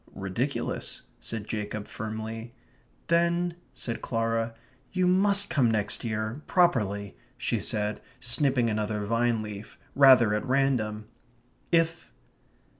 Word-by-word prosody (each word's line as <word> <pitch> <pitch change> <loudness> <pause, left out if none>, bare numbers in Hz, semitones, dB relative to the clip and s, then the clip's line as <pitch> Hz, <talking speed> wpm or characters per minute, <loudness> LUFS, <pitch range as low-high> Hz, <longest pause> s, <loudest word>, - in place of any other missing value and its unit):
"Ridiculous," 105 +9 -3 0.2
said 110 -2 -4
Jacob, 105 -1 -4
firmly. 110 +2 -6 0.5
"Then 170 +1 +2
..." - - -36
said 115 - -4
Clara, 115 0 -1 0.4
"you 185 -1 +1
must 200 +2 +3
come 130 -7 +3
next 105 -2 -1
year, 110 +4 -3
properly," 105 - +2 0.2
she - - -1
said, 105 0 -1 0.2
snipping 125 0 +2
another 105 -1 -1
vine 115 0 +1
leaf, 105 0 -8 0.2
rather 130 -6 +7
at 105 - 0
random. 125 -6 +1 0.7
"If 165 0 +1
115 Hz, 115 wpm, -28 LUFS, 105-140 Hz, 0.7 s, rather